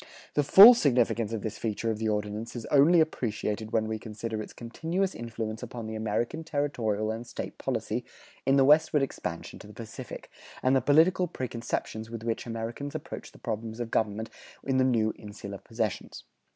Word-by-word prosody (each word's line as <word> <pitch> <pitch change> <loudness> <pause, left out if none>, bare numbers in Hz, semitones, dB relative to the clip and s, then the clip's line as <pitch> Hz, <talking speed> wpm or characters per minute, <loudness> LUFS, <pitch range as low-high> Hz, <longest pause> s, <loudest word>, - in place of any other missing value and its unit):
The 145 - +2
full 200 - +11
significance 120 - +2
of 110 -3 -3
this 110 - -4
feature 115 0 -1
of 110 - -4
the 110 -1 0
Ordinance 105 +2 -3
is 120 - -5
only 150 +5 +6
appreciated 110 -7 -2
when 110 -1 +1
we 110 0 -3
consider 110 0 -5
its - - -8
continuous 165 +11 -2
influence 110 -1 -5
upon 120 -2 -6
the 110 - -5
American 110 +8 -2
territorial 120 -9 -1
and 115 +2 -6
State - - -6
policy - - -2 0.4
in 135 - +3
the 135 -1 +5
westward 150 0 +5
expansion 85 -10 -5
to - - -12
the - - -12
Pacific, - - -8 0.3
and 130 +1 +4
the 135 - +4
political 165 +7 +4
preconceptions 115 -5 -4
with 115 -1 -7
which 115 +1 -2
Americans 115 +5 -5
approach - - -7
the - - -16
problems 110 +1 -5
of 120 -1 -4
government 110 0 -1 0.3
in 135 -1 0
the 130 - +4
new 115 -4 +2
insular 100 -1 -8
possessions. 110 -3 -4
115 Hz, 180 wpm, -28 LUFS, 110-135 Hz, 0.4 s, full